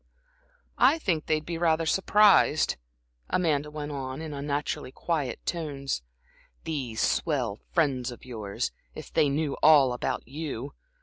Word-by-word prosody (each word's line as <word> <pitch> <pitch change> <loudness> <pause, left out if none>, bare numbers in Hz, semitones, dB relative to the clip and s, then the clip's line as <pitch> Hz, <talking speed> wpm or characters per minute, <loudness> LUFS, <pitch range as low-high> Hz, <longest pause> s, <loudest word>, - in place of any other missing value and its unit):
"I 290 +5 +6
think 175 - -1
they'd 155 -1 0
be 170 -1 -4
rather 165 -1 +2
surprised," 195 -2 +4 0.5
Amanda 150 -5 +1
went 150 0 -5
on, 130 -1 -5
in 160 -2 -6
unnaturally 145 -2 -3
quiet 145 -5 -2
tones, 140 - -3 0.6
"these 130 -8 -3
swell 125 -10 0
friends 135 -7 +1
of 120 - -10
yours, 110 -5 -4 0.2
if - - -9
they 145 - +4
knew 145 0 -1
all 145 -5 +6
about 125 - -3
you. 140 -2 -5
145 Hz, 130 wpm, -27 LUFS, 130-160 Hz, 0.6 s, I